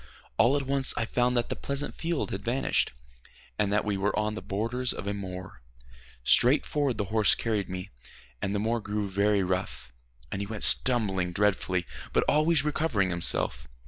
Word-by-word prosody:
All 120 Hz, +5 st, +5 dB
at 140 Hz, -, -2 dB
once 135 Hz, 0 st, 0 dB
I 115 Hz, -, 0 dB
found 125 Hz, +2 st, +1 dB
that 120 Hz, -, 0 dB
the -, -, -2 dB
pleasant 140 Hz, +1 st, -4 dB
field 170 Hz, -2 st, -2 dB
had 95 Hz, +1 st, -4 dB
vanished, 125 Hz, +4 st, 0 dB, 0.7 s
and 100 Hz, -1 st, +1 dB
that 105 Hz, +1 st, +1 dB
we 105 Hz, -2 st, -1 dB
were 100 Hz, +2 st, 0 dB
on 105 Hz, 0 st, 0 dB
the 110 Hz, -, -6 dB
borders 115 Hz, +5 st, -2 dB
of -, -, -7 dB
a 100 Hz, -, -1 dB
moor. 95 Hz, -7 st, -7 dB, 0.6 s
Straight 125 Hz, -, +4 dB
forward 140 Hz, -6 st, -1 dB
the 105 Hz, -, -1 dB
horse 105 Hz, +1 st, +3 dB
carried 110 Hz, -4 st, -2 dB
me, 90 Hz, +1 st, -6 dB, 0.5 s
and 100 Hz, +1 st, -1 dB
the -, -, +1 dB
moor 115 Hz, +3 st, 0 dB
grew 105 Hz, -1 st, -3 dB
very 100 Hz, +1 st, +2 dB
rough, 90 Hz, -9 st, -3 dB, 0.4 s
and 95 Hz, -, -3 dB
he 100 Hz, -, -4 dB
went 110 Hz, 0 st, -5 dB
stumbling 95 Hz, -8 st, +4 dB
dreadfully, 95 Hz, -3 st, +1 dB, 0.3 s
but -, -, +3 dB
always 155 Hz, +1 st, +3 dB
recovering 145 Hz, -, 0 dB
himself. 65 Hz, -7 st, +1 dB
105 Hz, 180 wpm, -28 LUFS, 95-125 Hz, 0.7 s, All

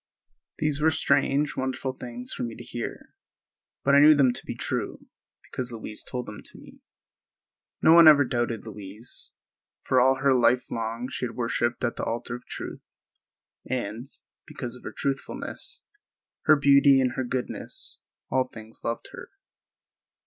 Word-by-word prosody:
These 150 Hz, -1 st, 0 dB
were 160 Hz, -, +5 dB
strange, 140 Hz, -1 st, +2 dB
wonderful 130 Hz, 0 st, -2 dB
things 125 Hz, -1 st, -5 dB
for -, -, -6 dB
me 115 Hz, -2 st, -3 dB
to 120 Hz, -, -10 dB
hear, 120 Hz, 0 st, -6 dB, 0.7 s
but 140 Hz, -, +3 dB
I 140 Hz, -, +8 dB
knew 150 Hz, +1 st, +8 dB
them 130 Hz, -4 st, +4 dB
to -, -, -7 dB
be -, -, -4 dB
true, -, -, -3 dB, 0.4 s
because 125 Hz, -1 st, -4 dB
Louise 110 Hz, -2 st, -6 dB
told 125 Hz, -1 st, -5 dB
them 105 Hz, -, -9 dB
to -, -, -9 dB
me. -, -, -15 dB, 1.0 s
No 160 Hz, -, +8 dB
one 170 Hz, -1 st, +9 dB
ever 145 Hz, -2 st, +8 dB
doubted 120 Hz, -3 st, -2 dB
Louise, 105 Hz, +2 st, -6 dB, 0.5 s
for 130 Hz, -1 st, +3 dB
all 130 Hz, +1 st, +5 dB
her 135 Hz, 0 st, +3 dB
life 125 Hz, 0 st, +3 dB
long 115 Hz, +2 st, -3 dB
she 130 Hz, -, -3 dB
had 115 Hz, -, -10 dB
worshiped 120 Hz, 0 st, -1 dB
at 120 Hz, -, -1 dB
the -, -, -3 dB
altar 120 Hz, +1 st, -3 dB
of 120 Hz, 0 st, -8 dB
truth, -, -, -8 dB, 0.7 s
and, 120 Hz, -1 st, -3 dB, 0.4 s
because 125 Hz, -6 st, -5 dB
of 125 Hz, -, -12 dB
her -, -, -4 dB
truthfulness, 275 Hz, -, -4 dB, 0.6 s
her 155 Hz, -, +7 dB
beauty 140 Hz, -1 st, +6 dB
and 130 Hz, -1 st, +2 dB
her 130 Hz, -, -2 dB
goodness, 125 Hz, 0 st, -3 dB, 0.3 s
all 130 Hz, 0 st, +2 dB
things 110 Hz, -2 st, -9 dB
loved 115 Hz, -, -3 dB
her. -, -, -10 dB
125 Hz, 160 wpm, -26 LUFS, 120-140 Hz, 1.0 s, one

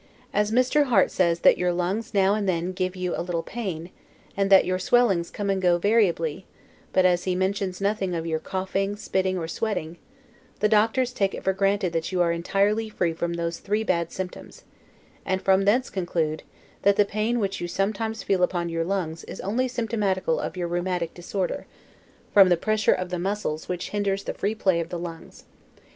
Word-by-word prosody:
As 210 Hz, 0 st, +2 dB
Mr. 255 Hz, +5 st, +3 dB
Harte 250 Hz, -4 st, +3 dB
Says 170 Hz, -2 st, +1 dB
THAT -, -, +5 dB
YOUR 180 Hz, 0 st, +2 dB
LUNGS 180 Hz, +6 st, -2 dB
NOW 195 Hz, 0 st, +4 dB
AND 205 Hz, -2 st, 0 dB
THEN 175 Hz, 0 st, -1 dB
GIVE 185 Hz, 0 st, -2 dB
YOU 180 Hz, -1 st, -2 dB
A -, -, -2 dB
LITTLE 170 Hz, -1 st, -2 dB
PAIN, 185 Hz, -6 st, -5 dB, 0.4 s
and 195 Hz, 0 st, +1 dB
that 195 Hz, -1 st, +7 dB
YOUR 185 Hz, 0 st, -1 dB
SWELLINGS 195 Hz, -5 st, +2 dB
COME 200 Hz, -1 st, -2 dB
AND 190 Hz, -1 st, -1 dB
GO 175 Hz, -2 st, +4 dB
VARIABLY, 185 Hz, -4 st, +1 dB, 0.4 s
but 185 Hz, -, +3 dB
as 180 Hz, -1 st, +3 dB
he 185 Hz, -1 st, 0 dB
mentions 190 Hz, 0 st, -1 dB
nothing 195 Hz, -2 st, 0 dB
of 165 Hz, -1 st, -3 dB
your 160 Hz, -1 st, -1 dB
coughing, 195 Hz, +3 st, -2 dB
spitting, 190 Hz, -2 st, -1 dB
or 165 Hz, -2 st, -3 dB
sweating, 175 Hz, -4 st, -3 dB, 0.6 s
the 210 Hz, -, +3 dB
doctors 225 Hz, +4 st, +2 dB
take 195 Hz, -5 st, 0 dB
it -, -, -8 dB
for 190 Hz, -, +2 dB
granted 195 Hz, -2 st, +1 dB
that 165 Hz, +2 st, -2 dB
you 185 Hz, -, -1 dB
are 170 Hz, -1 st, +3 dB
entirely 200 Hz, +6 st, +1 dB
free 175 Hz, -5 st, -1 dB
from 170 Hz, +1 st, -2 dB
those 170 Hz, 0 st, -3 dB
three 210 Hz, +2 st, -1 dB
bad 170 Hz, -5 st, 0 dB
symptoms: 185 Hz, -1 st, -7 dB, 0.6 s
and 190 Hz, 0 st, 0 dB
from 195 Hz, 0 st, +3 dB
thence 245 Hz, +6 st, +2 dB
conclude, 170 Hz, -4 st, -1 dB, 0.4 s
that, 200 Hz, 0 st, +4 dB
the 205 Hz, -, +4 dB
pain 215 Hz, +4 st, -1 dB
which 195 Hz, -2 st, -2 dB
you 175 Hz, -, -2 dB
sometimes 215 Hz, +4 st, -2 dB
feel 190 Hz, -2 st, +1 dB
upon 175 Hz, -1 st, 0 dB
your 165 Hz, 0 st, -1 dB
lungs 165 Hz, -3 st, -3 dB
is -, -, -8 dB
only 235 Hz, +7 st, 0 dB
symptomatical 210 Hz, -8 st, -1 dB
of -, -, -4 dB
your 175 Hz, -1 st, -1 dB
rheumatic 175 Hz, -1 st, -2 dB
disorder, 180 Hz, +1 st, -3 dB, 0.7 s
from 195 Hz, -2 st, +8 dB
the 175 Hz, -, +4 dB
pressure 215 Hz, +3 st, +2 dB
of 185 Hz, 0 st, -1 dB
the 180 Hz, -, -2 dB
muscles 185 Hz, -4 st, -3 dB
which 180 Hz, -1 st, -4 dB
hinders 200 Hz, -1 st, -1 dB
the -, -, -4 dB
free 210 Hz, +2 st, -2 dB
play 190 Hz, -5 st, +2 dB
of 165 Hz, 0 st, -3 dB
the 175 Hz, -, -4 dB
lungs. 170 Hz, -1 st, -8 dB
190 Hz, 195 wpm, -25 LUFS, 175-205 Hz, 0.7 s, from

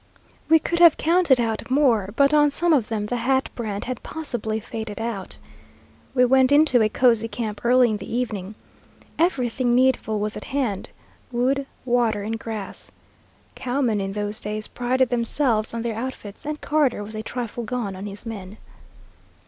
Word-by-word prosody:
We 320 Hz, -, +8 dB
could 340 Hz, +2 st, -2 dB
have 340 Hz, -3 st, +7 dB
counted 330 Hz, -5 st, +3 dB
out 225 Hz, -1 st, -2 dB
more, 250 Hz, -8 st, +3 dB
but 280 Hz, +2 st, +4 dB
on 295 Hz, -1 st, +5 dB
some 340 Hz, +4 st, +1 dB
of 250 Hz, -7 st, +2 dB
them 215 Hz, -2 st, -2 dB
the 245 Hz, +3 st, -2 dB
Hat 265 Hz, +3 st, +1 dB
brand 210 Hz, -4 st, -4 dB
had 250 Hz, -1 st, -4 dB
possibly 240 Hz, -8 st, -4 dB
faded 220 Hz, -1 st, -6 dB
out. 225 Hz, -4 st, -4 dB, 0.8 s
We 250 Hz, -1 st, +5 dB
went 260 Hz, +1 st, +4 dB
into 285 Hz, -4 st, +5 dB
a 215 Hz, -, +3 dB
cosy 230 Hz, -1 st, +3 dB
camp 215 Hz, -3 st, -5 dB
early 245 Hz, 0 st, +4 dB
in 215 Hz, -, -1 dB
the 195 Hz, -, -9 dB
evening. 215 Hz, -5 st, -3 dB, 0.6 s
Everything 255 Hz, -7 st, +1 dB
needful 250 Hz, -4 st, +2 dB
was 210 Hz, +1 st, -2 dB
at -, -, -7 dB
hand, 255 Hz, -8 st, -2 dB, 0.4 s
wood, 265 Hz, +3 st, 0 dB, 0.2 s
water, 235 Hz, -4 st, +1 dB
and 225 Hz, +2 st, -3 dB
grass. 220 Hz, -4 st, -6 dB, 0.6 s
Cowmen 245 Hz, -5 st, 0 dB
in 195 Hz, 0 st, -3 dB
those 210 Hz, +1 st, -3 dB
days 215 Hz, +1 st, -4 dB
prided 250 Hz, +1 st, 0 dB
themselves 235 Hz, -2 st, 0 dB
on 230 Hz, 0 st, -4 dB
their 230 Hz, -2 st, -2 dB
outfits, 230 Hz, -1 st, -6 dB
and 300 Hz, 0 st, -3 dB
Carter 285 Hz, -8 st, +1 dB
was 215 Hz, +2 st, -9 dB
a 215 Hz, -, -4 dB
trifle 240 Hz, 0 st, -5 dB
gone 225 Hz, -4 st, -3 dB
on 195 Hz, +2 st, -6 dB
his 205 Hz, +3 st, -9 dB
men. 210 Hz, -3 st, -7 dB
235 Hz, 170 wpm, -23 LUFS, 215-260 Hz, 0.8 s, We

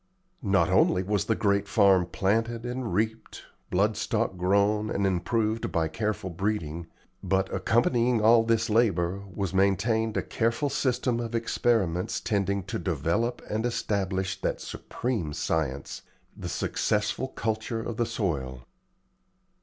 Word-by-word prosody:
Not 95 Hz, -, +2 dB
only 90 Hz, -, +4 dB
was 100 Hz, +1 st, 0 dB
the 110 Hz, -, +1 dB
great 100 Hz, -1 st, +1 dB
farm 95 Hz, -5 st, +4 dB
planted 115 Hz, +7 st, 0 dB
and 125 Hz, -1 st, -3 dB
reaped, 110 Hz, +1 st, -2 dB, 0.3 s
blood 105 Hz, +4 st, +2 dB
stock -, -, -1 dB
grown 100 Hz, +4 st, +2 dB
and 100 Hz, -, 0 dB
improved 110 Hz, +4 st, 0 dB
by 80 Hz, -2 st, 0 dB
careful 105 Hz, 0 st, -2 dB
breeding, 85 Hz, -4 st, -2 dB, 0.3 s
but, 95 Hz, 0 st, 0 dB
accompanying 120 Hz, +1 st, +2 dB
all 115 Hz, +1 st, +6 dB
this 115 Hz, -1 st, +1 dB
labor, 100 Hz, -5 st, +1 dB
was 95 Hz, -1 st, -3 dB
maintained 105 Hz, +4 st, +2 dB
a -, -, 0 dB
careful 120 Hz, +4 st, 0 dB
system 125 Hz, -3 st, 0 dB
of 115 Hz, -1 st, -4 dB
experiments 110 Hz, -6 st, 0 dB
tending 100 Hz, -2 st, 0 dB
to -, -, -4 dB
develop 115 Hz, +8 st, -1 dB
and 110 Hz, +1 st, -2 dB
establish 95 Hz, -5 st, -1 dB
that -, -, -1 dB
supreme 110 Hz, -12 st, -4 dB
science 70 Hz, -4 st, -2 dB, 0.3 s
the -, -, -6 dB
successful 105 Hz, +5 st, -1 dB
culture 115 Hz, -2 st, -3 dB
of 115 Hz, -1 st, -5 dB
the 120 Hz, -, +1 dB
soil. 70 Hz, -, -3 dB
105 Hz, 130 wpm, -27 LUFS, 95-115 Hz, 0.3 s, all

